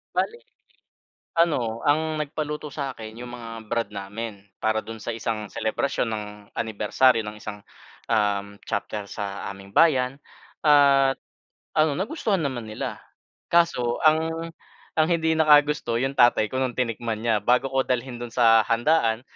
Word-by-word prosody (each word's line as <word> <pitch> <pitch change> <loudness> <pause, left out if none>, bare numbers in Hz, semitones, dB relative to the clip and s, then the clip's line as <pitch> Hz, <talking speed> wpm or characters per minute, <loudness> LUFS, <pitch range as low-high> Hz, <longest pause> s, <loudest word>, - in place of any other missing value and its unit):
Bale 470 +2 -1 0.9
ano 125 -10 +1
ang 155 +1 +2
nagpaluto 150 0 -4
sa'kin 130 -6 -6
'yong 120 0 -7
mga 120 -2 -8 0.2
brad 115 -1 -1
namin, 100 +1 -7 0.2
para 110 0 +2
do'n 115 0 -8
sa - - -3
isang 110 -1 -3
selebrasyon 115 +3 -1
ng 105 -1 -3 0.3
anibersaryo 110 +3 +2
ng 105 0 -7
isang, 105 -1 -7 0.5
uhm, 100 -2 0
chapter 105 0 -3
sa 100 -1 -5
aming 100 0 -11
bayan 135 -4 +4 0.4
at 140 -2 +5 0.6
ano 155 -1 +3
nagustuhan 205 - -1
naman 130 -5 -3
nila. 110 0 -5 0.5
Kaso 170 -9 +2
ang 160 +1 +2 0.5
ang 155 - +5
hindi 160 -1 +2
nakagusto 150 -6 +4
'yong 135 +2 -1
tatay 120 -3 +5
ko 130 - -2
nung 130 -2 -1
tinikman 115 -2 -2
niya. 115 -2 +2
Bago 125 +4 +2
ko 135 0 +2
dalhin 125 -1 -2
do'n 120 -1 -7
sa 115 -2 +6
handaan 115 -1 +2
120 Hz, 140 wpm, -25 LUFS, 110-150 Hz, 0.9 s, sa